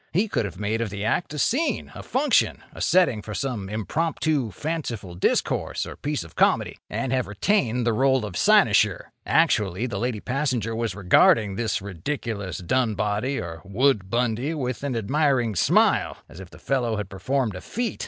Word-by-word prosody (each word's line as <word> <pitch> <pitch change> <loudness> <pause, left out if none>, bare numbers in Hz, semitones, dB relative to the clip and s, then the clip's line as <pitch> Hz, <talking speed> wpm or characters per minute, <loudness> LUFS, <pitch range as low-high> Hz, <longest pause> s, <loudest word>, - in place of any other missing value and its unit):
He 195 +7 +2
could 115 - -1
have 95 -1 -7
made 105 +2 -1
of 115 - -1
the 100 +1 -5
act 175 - 0
a 150 - -5
scene, 260 - 0
a - - -8
function, 265 0 +1
a - - -9
setting 175 -12 +3
for 105 0 -7
some 110 -6 -3
impromptu, 145 - -1
fanciful 115 - -4
discourse 85 - 0
or - - -8
piece 150 - -3
of 80 - -14
comedy—and 130 -2 0
have 130 -1 0
retained 120 - 0
the 115 - +2
role 130 0 +2
of 100 -4 -7
cynosure. - - +3 0.2
Actually, 100 +2 +2
the 125 - -3
lady 120 -2 -2
passenger 125 -3 -1
was 115 -4 -2
regarding 100 +2 +4
this 105 -1 -2
ridiculous 100 - -4
Dunboddy 110 +3 0
or 85 -2 -6
Woodbundy 120 - 0
with 125 -5 -3
an 140 -3 -2
admiring 125 0 +1
smile, 90 - +3
as 85 - -13
if 95 -3 -10
the - - -14
fellow 125 -5 -1
had 105 -3 -3
performed 110 +3 -1
a 95 - -7
feat! 235 -1 -3
115 Hz, 170 wpm, -24 LUFS, 100-135 Hz, 0.2 s, regarding